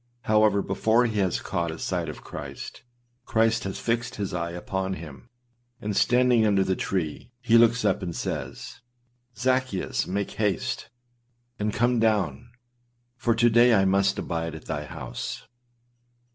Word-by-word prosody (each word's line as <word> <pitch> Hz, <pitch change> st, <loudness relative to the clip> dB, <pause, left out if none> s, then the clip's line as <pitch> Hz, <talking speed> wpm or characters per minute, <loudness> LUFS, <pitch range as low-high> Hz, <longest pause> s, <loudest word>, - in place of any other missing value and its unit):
However, 105 Hz, -2 st, +3 dB
before 115 Hz, +2 st, +2 dB
he 110 Hz, -3 st, -1 dB
has 95 Hz, -4 st, +1 dB
caught 85 Hz, -1 st, -2 dB
a 80 Hz, -, -5 dB
sight 85 Hz, -1 st, -2 dB
of 75 Hz, -, -9 dB
Christ, -, -, -8 dB, 0.5 s
Christ 110 Hz, -1 st, +2 dB
has 95 Hz, -, -3 dB
fixed 115 Hz, 0 st, -1 dB
his 100 Hz, -2 st, -3 dB
eye 85 Hz, -1 st, -2 dB
upon 95 Hz, +2 st, -3 dB
him, 75 Hz, -7 st, -10 dB, 0.5 s
and 105 Hz, -1 st, -3 dB
standing 125 Hz, 0 st, +4 dB
under 100 Hz, -3 st, +3 dB
the 95 Hz, -, 0 dB
tree, 90 Hz, 0 st, -3 dB
he 120 Hz, -2 st, +2 dB
looks 115 Hz, +1 st, +5 dB
up, -, -, +2 dB
and 85 Hz, -3 st, -4 dB
says, -, -, -5 dB, 0.5 s
âZaccheus, 130 Hz, -3 st, 0 dB
make 100 Hz, +1 st, -2 dB
haste, 110 Hz, +4 st, -1 dB, 0.7 s
and 105 Hz, +1 st, 0 dB
come 120 Hz, +2 st, +2 dB
down; 110 Hz, +1 st, +1 dB, 0.7 s
for 120 Hz, -2 st, +1 dB
to 120 Hz, +1 st, +4 dB
day 120 Hz, +1 st, +6 dB
I 95 Hz, -1 st, +4 dB
must 95 Hz, +1 st, +2 dB
abide 80 Hz, -1 st, -3 dB
at 80 Hz, -, -10 dB
thy 75 Hz, -1 st, -3 dB
house. 65 Hz, -, -6 dB
105 Hz, 150 wpm, -26 LUFS, 95-115 Hz, 0.7 s, day